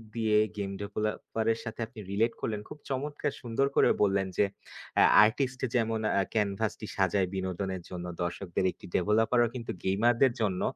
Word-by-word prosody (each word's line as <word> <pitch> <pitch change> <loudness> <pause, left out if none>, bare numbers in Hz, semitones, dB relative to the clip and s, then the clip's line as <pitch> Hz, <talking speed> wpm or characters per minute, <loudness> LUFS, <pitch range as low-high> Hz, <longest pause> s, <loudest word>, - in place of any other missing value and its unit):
দিয়ে 110 -2 +2 0.2
game 100 -1 -2
developer 110 +2 -3
এর 115 - -8
সাথে 115 0 -6
আপনি 115 -2 -13
রিলেট 115 +4 +2
করলেন 105 -2 -2
খুব 150 - -9
চমৎকার 145 +2 -2
সুন্দর 125 +3 0
করে - - +5
বললেন 95 -1 +2
যে, 105 - +5 0.5
"এ্যা - - +7 0.2
আর্টিস্ট 130 +3 -1
যেমন 115 -2 +1 0.2
আ - - +3
ক্যানভাস 105 0 0
টি 110 - -6
সাজায় 95 0 +2
বিনোদনের 95 0 -3
জন্য, 90 -1 -6 0.2
দর্শকদের, 85 +1 -2
একটি - - -15
ডেভেলপার 110 +6 +3
ও - - 0
কিন্তু 115 -2 -4
গেমার 105 +6 +3
দের 130 -3 +4
জন্য 95 -4 0
110 Hz, 175 wpm, -29 LUFS, 95-115 Hz, 0.5 s, এ্যা